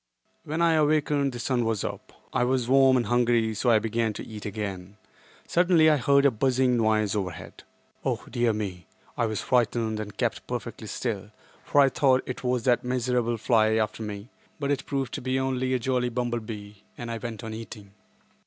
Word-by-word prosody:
When 160 +3 -1
I 165 -1 +4
awakened 150 -2 +2
the 120 - -7
sun 120 0 0
was 110 -3 -1
up. - - -6 0.2
I 125 - +2
was 125 -1 +1
warm 135 0 +5
and 120 - 0
hungry, 120 -2 +2
so 115 +4 0
I 115 - +6
began 115 0 -1
to - - -7
eat 105 -2 -7
again. 100 -2 -5 0.5
Suddenly 170 -3 +4
I 150 - +3
heard 140 +2 +3
a 140 - +6
buzzing 130 +2 +2
noise 110 -2 +2
overhead. 90 -5 -5 0.4
Oh, - - -2
dear 120 -1 +1
me! 95 -5 -5 0.3
I 115 - +1
was 110 -2 -2
frightened 115 -3 +1
and 105 -2 -7
kept - - -2
perfectly - - -5
still, - - -3 0.3
for 145 - +2
I 135 - +5
thought 130 -1 +3
it 125 - -6
was 125 -2 0
that 125 -1 +2
miserable 125 -1 0
fly 110 -1 +3
after 110 0 -1
me, 105 +1 -6 0.3
but 140 -1 -1
it 140 -2 -2
proved 135 -3 -2
to - - -4
be 130 +1 0
only 130 -1 -1
a - - +3
jolly 125 0 0
bumble 120 0 -1
bee, 105 -2 -9
and 120 -1 -5
I 115 - -4
went 115 0 -6
on 110 -1 -5
eating. 110 -2 -9
120 Hz, 195 wpm, -26 LUFS, 110-130 Hz, 0.5 s, I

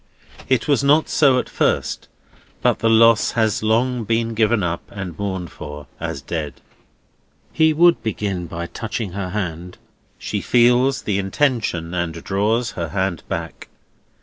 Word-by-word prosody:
It 130 -4 +1
was 140 -2 +2
not 150 +3 +4
so 135 -4 +4
at - - -1
first; - - -1 0.6
but - - +2
the 115 - +2
lost 115 0 +5
has 110 -2 +1
long 115 +3 +1
been 115 +1 0
given 110 -1 +2
up, 85 -1 -2
and 95 -4 -6
mourned 95 -4 -3
for, 75 0 -9
as 70 - -5
dead. 75 -1 -4 0.9
He 160 -1 +4
would 170 +2 +4
begin 100 -6 -3
by 85 +1 -5
touching 110 +1 -5
her 95 0 -4
hand. 90 -3 -4 0.4
She - - -3
feels 125 +2 +3
the 100 -2 0
intention, 95 - -1
and 85 -2 -2
draws 110 +4 0
her 85 -2 -4
hand 95 -4 -1
back. - - -5
105 Hz, 150 wpm, -21 LUFS, 90-120 Hz, 0.9 s, lost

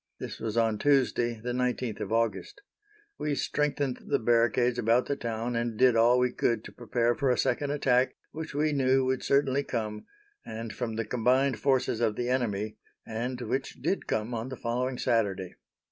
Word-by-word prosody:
This - - -6
was 110 0 -3
on 110 -2 +2
Tuesday, 125 -5 +2
the 125 +3 -4
19th 125 -2 -1
of - - -4
August. 115 - -1 0.6
We 150 -1 -1
strengthened 145 -3 -1
the - - +2
barricades 120 +1 +2
about 120 +2 +3
the 140 - -1
town, 115 -1 -3
and 115 -1 -2
did 125 -1 +5
all 120 +2 +5
we 125 0 +2
could 115 -2 0
to - - -10
prepare 120 0 0
for 140 +1 0
a 125 - +2
second 145 -1 0
attack, 130 -3 +2 0.2
which 155 -2 -6
we 150 +1 +1
knew 135 -1 +3
would 130 0 0
certainly 140 0 +2
come, 110 -5 -4 0.4
and 110 0 -6
from 115 -3 -3
the 115 0 -2
combined 125 +3 +2
forces 130 -4 +1
of 110 -3 +1
the 120 0 -2
enemy, 110 -5 -1 0.3
and 125 +3 -4
which 135 +2 -2
did 165 +9 -1
come 110 +3 -1
on 115 +2 -3
the 130 - -6
following 125 +2 -2
Saturday. 100 -7 0
120 Hz, 180 wpm, -28 LUFS, 115-130 Hz, 0.6 s, did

